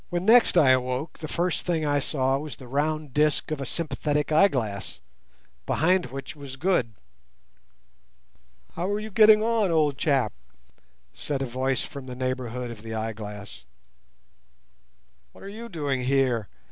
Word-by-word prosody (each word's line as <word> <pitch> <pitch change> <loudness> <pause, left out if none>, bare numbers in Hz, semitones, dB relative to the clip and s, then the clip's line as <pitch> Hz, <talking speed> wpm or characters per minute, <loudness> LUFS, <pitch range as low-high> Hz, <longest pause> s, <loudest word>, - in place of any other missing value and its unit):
When 175 +1 -2
next 230 -3 +6
I 145 -6 +6
awoke 130 +4 -1
the 155 - -5
first 175 +3 -1
thing 165 -3 -1
I 145 -1 +2
saw 135 -2 0
was 150 0 -6
the 130 - -12
round 150 +1 -1
disc 150 +2 +1
of 150 -3 -2
a 135 - -4
sympathetic 150 -1 -2
eyeglass, 130 - +1 0.7
behind 180 +1 +2
which 135 +4 -7
was 140 -3 -9
Good. 135 - 0 1.8
"How 175 +3 -2
are 205 +1 0
you 215 +1 -7
getting 215 +1 +6
on, 225 -3 +2
old 150 -4 +2
chap?" 135 -8 +1 0.8
said 140 -2 -3
a - - -1
voice 130 +2 -1
from 140 -2 -9
the 125 - -6
neighbourhood 125 -1 -3
of 110 -3 -10
the 110 0 -6
eyeglass. 105 - -6 1.7
"What - - -15
are - - -8
you 230 +3 -8
doing 145 - -2
here?" 125 -4 +1
140 Hz, 150 wpm, -26 LUFS, 125-165 Hz, 1.8 s, next